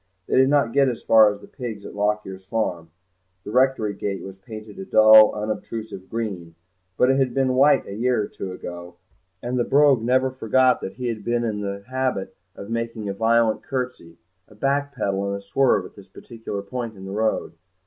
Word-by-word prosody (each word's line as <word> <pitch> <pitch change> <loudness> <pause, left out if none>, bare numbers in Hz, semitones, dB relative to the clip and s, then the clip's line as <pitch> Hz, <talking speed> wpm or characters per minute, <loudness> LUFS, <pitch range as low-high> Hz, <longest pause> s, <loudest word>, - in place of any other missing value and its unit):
They - - -1
did 130 +1 +5
not 140 -5 +2
get 140 -1 +4
as 120 - -6
far 110 -2 +6
as 100 0 -9
the - - -13
pigs 115 -6 -7
at - - -9
Lockyer's 105 -2 -2
farm; 90 -5 -3 0.5
the - - -7
rectory 125 -4 +2
gate 100 0 -4
was 95 -1 -9
painted 110 +1 -10
a - - -5
dull 110 +2 +7
unobtrusive 110 -2 -5
green, 95 -8 -5 0.4
but 125 - +4
it 135 - +2
had 130 -3 0
been 135 -1 +2
white 140 +3 +4
a 100 - -8
year 120 +1 0
or - - -5
two 95 - -7
ago, 85 -1 -8 0.5
and 125 +1 -2
the - - +3
Brogue 140 -2 +4
never 130 +3 +2
forgot 130 +1 +2
that 95 - -6
he 125 - -7
had 115 -3 -3
been 120 +2 0
in 105 -3 -2
the 100 0 -5
habit 130 -6 -2 0.2
of 100 - -9
making 115 -2 -3
a - - -2
violent 115 +1 +2
curtsey, 125 -11 -5 0.3
a 105 - -18
back 140 +5 0
pedal 100 -4 -1
and 100 0 -2
a - - -8
swerve 100 0 +1
at - - -12
this 100 -1 -15
particular 110 0 -8
point 115 +1 -6
of 95 - -10
the 95 - -7
road. 110 +2 -1
110 Hz, 205 wpm, -23 LUFS, 100-125 Hz, 0.5 s, dull